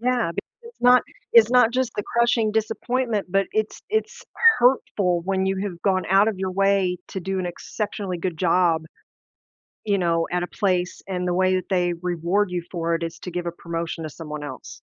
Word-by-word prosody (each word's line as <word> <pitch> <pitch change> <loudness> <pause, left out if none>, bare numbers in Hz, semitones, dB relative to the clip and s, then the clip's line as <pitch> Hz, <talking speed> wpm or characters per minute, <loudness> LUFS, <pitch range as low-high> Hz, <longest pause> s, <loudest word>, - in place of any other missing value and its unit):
Yeah, 240 -7 +1
because - - -8
it's 470 - -18
not 250 0 +6 0.3
it's 230 -1 +7
not 245 -2 +5
just 255 -1 0
the 205 - -1
crushing 235 -1 +1
disappointment, 225 0 -1
but 195 +1 +2
it's 215 0 -2
it's 440 +3 -2 0.4
hurtful 200 -8 +2
when 190 0 0
you 195 0 0
have 180 -4 -5
gone 190 -2 +1
out 195 +3 +5
of 205 - -3
your 190 0 -2
way 195 -2 +2
to 190 - -5
do 190 +2 -3
an 185 - -2
exceptionally 195 +1 -4
good 170 -1 -3
job, 170 -1 +2 1.0
you 200 -2 +1
know, 165 -2 +1
at 180 0 0
a - - -7
place, 180 -3 -1
and 180 -1 -2
the 175 - 0
way 185 0 +3
that 185 - -4
they 180 -2 +1
reward 180 +3 -1
you 175 -1 -2
for 170 -2 -1
it, 165 - -2
is 165 0 -5
to 180 - -6
give 175 0 -4
a 170 - -2
promotion 165 -1 -5
to 155 - -5
someone 150 -1 -7
else. 130 -4 -9
185 Hz, 200 wpm, -23 LUFS, 175-215 Hz, 1.0 s, it's